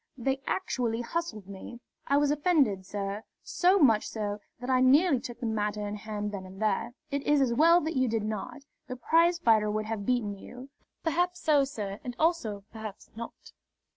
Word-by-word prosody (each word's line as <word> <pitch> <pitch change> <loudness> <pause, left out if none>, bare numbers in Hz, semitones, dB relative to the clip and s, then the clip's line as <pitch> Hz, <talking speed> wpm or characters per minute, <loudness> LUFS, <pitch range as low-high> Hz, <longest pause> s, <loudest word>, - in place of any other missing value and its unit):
They 270 +2 -1
actually 240 -10 -1
hustled 240 - -4
me. 200 +5 -9 0.3
I 280 - +3
was 290 0 +3
offended, 290 - +2
sir 200 +1 -3 0.2
so 370 +2 +3
much 230 - +4
so 210 -2 -3 0.2
that 245 - -6
I 255 -1 +3
nearly 280 +3 +5
took 240 -1 -8
the 245 - -4
matter 210 -1 -1
in 205 - -4
hand 210 -1 -4
then 200 -2 -5
and 190 +1 -11
there." 220 +3 0 0.2
"It 280 0 -1
is 295 +1 +3
as 260 -3 +2
well 335 +7 +6
that 315 +1 -3
you 260 -1 +2
did 225 -2 -1
not. 215 +7 -5 0.2
The 255 - -5
prizefighter 255 -6 +3
would 215 0 -1
have 220 -2 -3
beaten 215 -6 0
you." 255 +5 -11 0.3
"Perhaps 355 +2 0
so, 295 -3 +4
sir 210 -7 -5
and 245 -1 -5
also, 240 - 0
perhaps 220 -2 -9
not." 235 +1 -9
240 Hz, 185 wpm, -29 LUFS, 210-290 Hz, 0.3 s, well